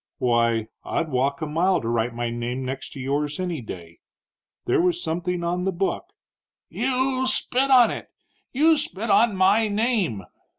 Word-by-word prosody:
"Why, 115 -2 +1 0.2
I'd 160 - -2
walk 140 +3 0
a - - 0
mile 170 +5 +1
to 115 - -6
write 115 0 -1
my 120 0 -2
name 120 +2 -4
next 135 +1 -6
to - - -9
yours 145 +4 -2
any 175 -6 -3
day. 85 -6 -10 0.7
There - - +2
was 175 -1 +1
something 175 +1 -3
on 175 +1 -1
the 190 - 0
book 190 - -2 0.4
" - - -70 0.2
"You 260 0 +1
spit 260 +1 +2
on 250 -3 +6
it! - - -7 0.4
You 310 +3 +4
spit 225 -6 -3
on 210 +1 +4
my 200 +4 +3
name!" 205 - 0
170 Hz, 170 wpm, -24 LUFS, -, 0.7 s, on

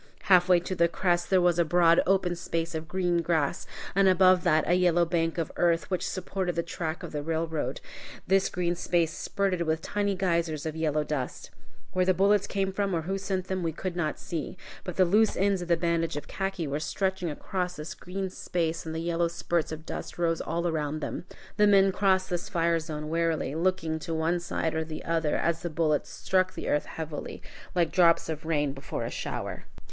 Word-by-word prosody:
Halfway 180 -2 +5
to 185 - -4
the 170 -2 +3
crest 175 0 0
there 190 - +5
was 175 -1 +3
a - - +6
broad 170 0 +4
open 185 -2 +2
space 165 -1 -3
of 160 0 -4
green 175 -1 +1
grass, 160 -4 0 0.3
and 195 0 +4
above 185 -1 +5
that 155 -4 +3
a 175 - +3
yellow 175 -1 +4
bank 165 -1 0
of 165 -2 -2
earth, 170 +1 +2
which 185 - -1
supported 185 -1 -3
the 170 - 0
track 165 0 -4
of 170 - -6
the 150 - -3
railroad. 160 0 -2 0.4
This 195 0 +3
green 175 -1 0
space 170 -1 0
spurted 195 -3 -1
with 160 -1 0
tiny 205 -1 0
geysers 170 -5 0
of 160 -1 -3
yellow 155 -2 0
dust. 145 -4 -4 0.4
Where 185 - +2
the 185 0 +3
bullets 200 +2 +3
came 195 -1 -1
from 195 -2 0
or 165 - -1
who 195 +4 -2
sent 190 -1 -2
them 190 -1 -2
we 165 -2 -1
could 180 +2 -4
not 155 -3 -1
see. 165 +2 -5 0.3
But 180 - -5
the 185 - +5
loose 210 +5 +3
ends 195 -1 +2
of 175 - -5
the 170 -1 +3
bandage 165 -2 0
of 145 - -6
khaki 195 -3 -3
were 145 +1 -2
stretching 190 +3 -1
across 180 +4 -3
this 150 +2 -6
green 190 +1 -5
space 165 -3 -2
and 160 - -4
the 160 - -2
yellow 170 0 +1
spurts 170 -1 -1
of 155 0 -7
dust - - -6
rose 165 -1 +1
all 170 +2 -1
around 155 -2 -2
them. 160 - -4 0.3
The 210 - +5
men 195 -1 +5
crossed 190 -1 +2
this 175 -1 -2
fire 170 -3 +2
zone 155 -2 -5
warily, 165 -4 0
looking 165 -1 0
to 165 +1 -4
one 165 +2 +1
side 170 -2 -2
or 160 0 0
the 155 -1 -7
other, 165 -2 +1
as 170 -1 0
the 175 - -3
bullets 155 -2 0
struck 185 -1 0
the - - -4
earth 150 - +1
heavily, 160 -2 -6 0.3
like 170 -2 +2
drops 170 -3 +4
of 155 -1 -4
rain 145 -4 +1
before 135 -1 -5
a - - -4
shower. - - -5
170 Hz, 210 wpm, -28 LUFS, 160-185 Hz, 0.4 s, a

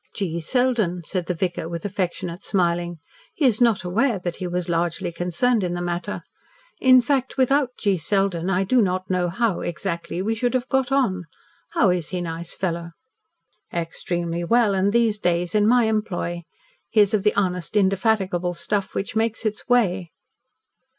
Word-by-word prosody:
"G. 170 -5 -2
Selden," 215 -3 +1
said 180 0 -3
the 180 - -1
vicar, 170 -1 -2
with 170 +1 -5
affectionate 185 -2 -3
smiling. 175 -3 0 0.4
"He 300 - +1
is 240 -3 +3
not 230 -5 +3
aware 220 +6 +1
that 175 -2 -4
he 185 - -4
was 180 0 -2
largely 170 0 -1
concerned 180 +7 +1
in 175 -1 -1
the - - -3
matter. 175 +3 -3 0.6
In 255 -1 +7
fact, 265 0 0
without 270 +1 +3
G. 200 -3 +1
Selden, 190 0 0
I 190 0 +2
do 245 +6 +3
not 185 -1 -1
know 180 -1 +1
how, 205 +1 0
exactly, 170 +1 -4
we 220 +3 0
should 245 +3 -1
have 255 0 0
got 265 -1 +1
on. 195 -10 +1 0.5
How 200 -6 +4
is 175 -3 -1
he, 180 - -2
nice 170 0 -4
fellow?" 170 -2 -3 0.8
"Extremely 170 0 -3
well, 225 +2 +3
and 190 0 +1
in - - +2
these 225 -2 +2
days 175 -1 0
in 210 -1 +3
my 245 +1 +5
employ. 185 -6 -2 0.4
He 220 - +2
is 205 0 +3
of 215 - +2
the 210 +1 +2
honest, 180 -1 -1
indefatigable 190 -3 +1
stuff 200 +3 -2
which 195 - -3
makes 225 +1 0
its 215 +3 -3
way." 190 -8 +2
190 Hz, 175 wpm, -23 LUFS, 175-220 Hz, 0.8 s, In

